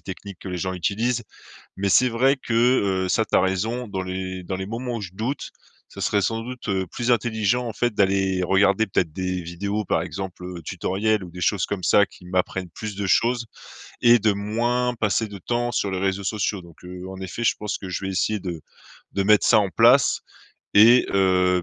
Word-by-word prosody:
techniques 95 Hz, 0 st, -9 dB
que -, -, -7 dB
les 90 Hz, -1 st, -4 dB
gens 95 Hz, +1 st, -2 dB
utilisent. 110 Hz, +8 st, -1 dB, 0.5 s
Mais 100 Hz, +1 st, -1 dB
c'est 125 Hz, +6 st, +5 dB
vrai 130 Hz, +4 st, +3 dB
que, 125 Hz, -3 st, -5 dB, 0.5 s
heu, -, -, -3 dB
ça, 110 Hz, +4 st, +2 dB
tu -, -, -1 dB
as -, -, +5 dB
raison, 110 Hz, +6 st, -1 dB
dans 95 Hz, -2 st, -4 dB
les 95 Hz, 0 st, -5 dB
dans 95 Hz, +2 st, -4 dB
les 95 Hz, 0 st, -5 dB
moments 120 Hz, +2 st, -4 dB
où -, -, -6 dB
je 95 Hz, -, -6 dB
doute, 120 Hz, +8 st, -4 dB, 0.4 s
ça -, -, -9 dB
serait 100 Hz, -, +1 dB
sans 115 Hz, +3 st, -1 dB
doute, 125 Hz, +1 st, -8 dB
heu, 95 Hz, -1 st, 0 dB
plus 120 Hz, +7 st, -1 dB
intelligent, 120 Hz, +1 st, +1 dB
en 115 Hz, -, -5 dB
fait, 120 Hz, +1 st, 0 dB
d'aller 95 Hz, -2 st, +1 dB
regarder 100 Hz, +4 st, +3 dB
peut-être 85 Hz, -4 st, 0 dB
des 90 Hz, 0 st, -2 dB
vidéos, 100 Hz, +5 st, -3 dB
par -, -, +1 dB
exemple, 95 Hz, -2 st, -6 dB
heu, 90 Hz, -1 st, -7 dB
tutoriel 100 Hz, +6 st, -1 dB
ou 90 Hz, -, -9 dB
des 90 Hz, +1 st, -9 dB
choses 100 Hz, 0 st, +1 dB
comme 100 Hz, -3 st, -4 dB
ça 100 Hz, +3 st, +5 dB
qui 90 Hz, -, -17 dB
m'apprennent 90 Hz, 0 st, -2 dB
plus 105 Hz, +4 st, -7 dB
de 100 Hz, 0 st, -3 dB
choses 120 Hz, +5 st, +2 dB, 0.6 s
et 120 Hz, 0 st, +6 dB
de 110 Hz, 0 st, +3 dB
moins 120 Hz, +5 st, 0 dB
passer 110 Hz, -1 st, 0 dB
de 100 Hz, -1 st, -9 dB
temps 120 Hz, +5 st, -1 dB
sur 105 Hz, -3 st, -1 dB
les 95 Hz, -1 st, -2 dB
réseaux 95 Hz, +1 st, -1 dB
sociaux. 105 Hz, -1 st, -1 dB
Donc, 85 Hz, -1 st, -17 dB
heu, 90 Hz, +1 st, -8 dB
en 95 Hz, 0 st, -8 dB
effet, 95 Hz, +5 st, -5 dB
je 115 Hz, -, +3 dB
pense 105 Hz, -1 st, -3 dB
que 95 Hz, -, -7 dB
je 90 Hz, +2 st, -4 dB
vais 95 Hz, -, -2 dB
essayer 105 Hz, +3 st, 0 dB
de-de 85 Hz, -4 st, -8 dB, 0.4 s
mettre 105 Hz, +1 st, +4 dB
ça 110 Hz, -, +6 dB
en 100 Hz, -2 st, +2 dB
place 120 Hz, +7 st, +4 dB, 0.5 s
et 115 Hz, +4 st, +7 dB
heu, 90 Hz, -2 st, +3 dB
100 Hz, 215 wpm, -23 LUFS, 95-115 Hz, 0.6 s, et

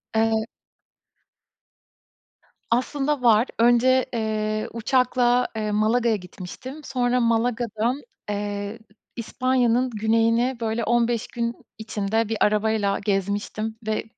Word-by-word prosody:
Eee. 220 Hz, 0 st, +2 dB, 2.3 s
Aslında 275 Hz, +3 st, 0 dB
var. 235 Hz, 0 st, +4 dB
Önce, 245 Hz, +2 st, +4 dB
eee, 215 Hz, -1 st, -1 dB
uçakla, 245 Hz, +1 st, +2 dB
eee, 215 Hz, -1 st, -2 dB
Malaga'ya 220 Hz, +2 st, +2 dB
gitmiştim. 200 Hz, -, -9 dB
Sonra 250 Hz, -2 st, 0 dB
Malaga'dan, 235 Hz, +1 st, 0 dB, 0.3 s
eee, 205 Hz, +1 st, -3 dB, 0.4 s
İspanya'nın 250 Hz, +1 st, +1 dB
güneyini, 230 Hz, +3 st, +1 dB
böyle, 225 Hz, +1 st, -1 dB
15 235 Hz, 0 st, +1 dB
gün 235 Hz, -1 st, -3 dB, 0.2 s
içinde 220 Hz, 0 st, -1 dB
bir 225 Hz, -, -1 dB
arabayla 210 Hz, -1 st, +1 dB
gezmiştim 205 Hz, +2 st, -2 dB
ve 215 Hz, -, 0 dB
230 Hz, 95 wpm, -24 LUFS, 215-245 Hz, 2.3 s, var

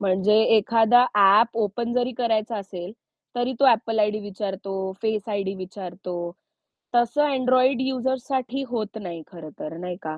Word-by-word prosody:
म्हणजे 195 Hz, +2 st, +2 dB, 0.2 s
एखादा 230 Hz, +3 st, +5 dB
app 210 Hz, +3 st, +5 dB
open 235 Hz, +4 st, -3 dB
जरी 250 Hz, 0 st, 0 dB
करायचं 225 Hz, -2 st, 0 dB
असेल, 185 Hz, -1 st, -8 dB, 0.4 s
तरी 245 Hz, +1 st, 0 dB
तो 275 Hz, -, +5 dB
Apple 225 Hz, 0 st, 0 dB
आयडी 210 Hz, 0 st, +1 dB
विचारतो, 195 Hz, -1 st, -5 dB, 0.3 s
फेस 220 Hz, -1 st, -1 dB
आयडी 200 Hz, -2 st, -2 dB
विचारतो. 185 Hz, -1 st, -7 dB, 0.8 s
तसं 240 Hz, +5 st, +3 dB
Android 255 Hz, 0 st, +3 dB
युजर्ससाठी 260 Hz, 0 st, -2 dB
होत 220 Hz, -3 st, -4 dB
नाही, 170 Hz, -3 st, -6 dB
खरं 165 Hz, -3 st, -9 dB
तर 155 Hz, +2 st, -6 dB
नाही 180 Hz, 0 st, -5 dB
का? 155 Hz, 0 st, -5 dB
215 Hz, 140 wpm, -24 LUFS, 195-245 Hz, 0.8 s, एखादा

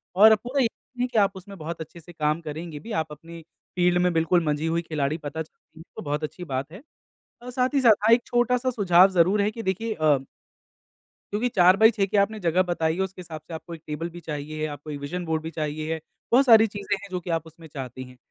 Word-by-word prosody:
और 220 Hz, +3 st, +8 dB
पूरा 245 Hz, +6 st, -2 dB
यकीन 245 Hz, +2 st, -5 dB
है 250 Hz, -, +2 dB
कि 245 Hz, -2 st, -3 dB
आप 200 Hz, -1 st, +2 dB
उसमें 195 Hz, +1 st, -11 dB
बहुत 165 Hz, 0 st, -6 dB
अच्छे 160 Hz, +2 st, -9 dB
से 175 Hz, +2 st, -14 dB
काम 155 Hz, 0 st, 0 dB
करेंगे 155 Hz, 0 st, -6 dB
भी, 230 Hz, -, -10 dB
आप 160 Hz, -5 st, -2 dB
अपनी 165 Hz, +3 st, -10 dB, 0.3 s
फ़ील्ड 180 Hz, 0 st, +3 dB
में 180 Hz, 0 st, +3 dB
बिल्कुल 165 Hz, +1 st, +2 dB
मंझी 150 Hz, +1 st, 0 dB
हुई 165 Hz, +1 st, 0 dB
खिलाड़ी 155 Hz, -2 st, -2 dB
पता 155 Hz, 0 st, -5 dB
चलती 160 Hz, 0 st, -14 dB
हैं -, -, -10 dB
तो -, -, -6 dB
बहुत 150 Hz, +1 st, -3 dB
अच्छी 165 Hz, +4 st, -5 dB
बात 135 Hz, -2 st, -4 dB
है। 190 Hz, +6 st, -11 dB, 0.6 s
अ, 245 Hz, -, -8 dB
साथ 250 Hz, +2 st, 0 dB
ही 280 Hz, -, +3 dB
साथ 220 Hz, -4 st, +5 dB
हा 230 Hz, -, +7 dB
एक 235 Hz, +1 st, +4 dB
छोटा-सा 250 Hz, +1 st, +1 dB
सुझाव 190 Hz, -5 st, +5 dB
जरूर 185 Hz, +3 st, +3 dB
है 205 Hz, +1 st, +1 dB
कि 225 Hz, +1 st, -7 dB
देखिए 220 Hz, +4 st, -1 dB
अ 155 Hz, -5 st, +3 dB, 1.2 s
क्योंकि 220 Hz, +4 st, 0 dB
4 180 Hz, -1 st, +6 dB
बाई 220 Hz, +2 st, +7 dB
6 205 Hz, -3 st, 0 dB
की 200 Hz, +2 st, -1 dB
आपने 215 Hz, +2 st, +2 dB
जगह 175 Hz, -1 st, +2 dB
बताई 160 Hz, -2 st, 0 dB
है 190 Hz, -, -2 dB
उसके 190 Hz, -1 st, -4 dB
हिसाब 160 Hz, -3 st, -8 dB
से -, -, -9 dB
आपको 160 Hz, +1 st, -7 dB
एक 160 Hz, -, -15 dB
टेबल 160 Hz, +3 st, -4 dB
भी 175 Hz, +1 st, -10 dB
चाहिए, 155 Hz, -1 st, -5 dB
आपको 145 Hz, 0 st, -8 dB
ये 145 Hz, -, -4 dB
विजन 165 Hz, +6 st, -5 dB
बोर्ड 160 Hz, -1 st, -1 dB
भी 160 Hz, -, -4 dB
चाहिए। 155 Hz, +1 st, -3 dB, 0.3 s
बहुत 260 Hz, +4 st, +5 dB
सारी 225 Hz, -3 st, +7 dB
चीज़ें 205 Hz, -1 st, -3 dB
हैं 200 Hz, +1 st, -10 dB
जो 180 Hz, -, -2 dB
कि 180 Hz, -, -10 dB
आप 165 Hz, -1 st, -1 dB
उसमें 160 Hz, 0 st, -14 dB
चाहती 130 Hz, -3 st, -7 dB
हैं। 125 Hz, 0 st, -14 dB
175 Hz, 245 wpm, -25 LUFS, 155-205 Hz, 1.2 s, और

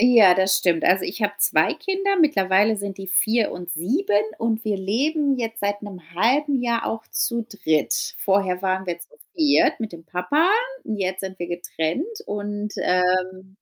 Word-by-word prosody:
Ja, 230 Hz, -6 st, +7 dB
das 190 Hz, +1 st, +3 dB
stimmt. 175 Hz, -3 st, +1 dB
Also, 185 Hz, +1 st, +3 dB
ich 225 Hz, -, -5 dB
habe 205 Hz, 0 st, 0 dB
2 160 Hz, -, +3 dB
Kinder, 390 Hz, +3 st, -1 dB
mittlerweile 210 Hz, -, +3 dB
sind 200 Hz, -1 st, -5 dB
die 195 Hz, 0 st, -8 dB
4 220 Hz, +4 st, +2 dB
und 175 Hz, 0 st, -7 dB
7 205 Hz, -, +1 dB, 0.2 s
und 225 Hz, 0 st, -1 dB
wir 210 Hz, -2 st, 0 dB
leben 275 Hz, +9 st, 0 dB
jetzt 225 Hz, -2 st, -4 dB
seit 205 Hz, +1 st, -2 dB
'nem 200 Hz, -3 st, -8 dB
1/2 265 Hz, -, +2 dB
Jahr 235 Hz, -1 st, 0 dB
auch 225 Hz, 0 st, -4 dB
zu 235 Hz, -2 st, -1 dB
3. 160 Hz, -9 st, -1 dB
Vorher 190 Hz, -2 st, 0 dB
waren 190 Hz, 0 st, -1 dB
wir 175 Hz, -1 st, -3 dB
zu -, -, -12 dB, 0.3 s
4. 305 Hz, -4 st, +3 dB
mit 220 Hz, -5 st, -4 dB
dem 165 Hz, -1 st, -11 dB
Papa 185 Hz, -, +1 dB, 0.4 s
und 215 Hz, -, -3 dB
jetzt 190 Hz, -1 st, -2 dB
sind 190 Hz, -1 st, -7 dB
wir 175 Hz, -, -4 dB
getrennt. 175 Hz, -, -3 dB, 0.2 s
Und, 205 Hz, 0 st, -4 dB
ähm 185 Hz, +1 st, 0 dB
205 Hz, 175 wpm, -23 LUFS, 185-230 Hz, 0.4 s, Ja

